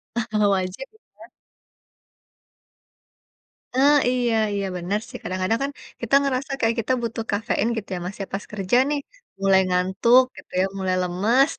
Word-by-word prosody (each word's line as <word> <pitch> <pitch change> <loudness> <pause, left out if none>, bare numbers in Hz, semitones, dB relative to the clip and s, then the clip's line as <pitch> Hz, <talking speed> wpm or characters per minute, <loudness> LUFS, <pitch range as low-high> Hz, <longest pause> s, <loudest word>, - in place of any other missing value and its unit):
Nah, 235 - +1
kalau 210 -1 +3
wajib 185 +8 -3
gitu 440 - -29
kan - - -13 2.5
Ah, 280 +3 +5
iya 245 -2 +1 0.2
iya 200 -1 -1
bener 180 +4 -1
sih, - - -8
kadang-kadang 185 +4 -1
kan, 280 - -2 0.3
kita 235 +3 +2
ngerasa 275 0 -1
kayak 230 -1 +1
kita 230 +3 0
butuh 230 -1 -3
kafein 210 +1 0
gitu 215 - -5
ya, 180 - -4
Mas, 185 - -5
ya, - - -2
pas 195 - -3
kerja 200 +2 +1
nih, 295 -1 0 0.4
mulai 195 -1 +5
ngantuk 190 +8 +4
gitu - - -14
ya, - - +3
mulai 185 -1 0
lemes. 210 - +2
215 Hz, 160 wpm, -23 LUFS, 190-250 Hz, 2.5 s, Ah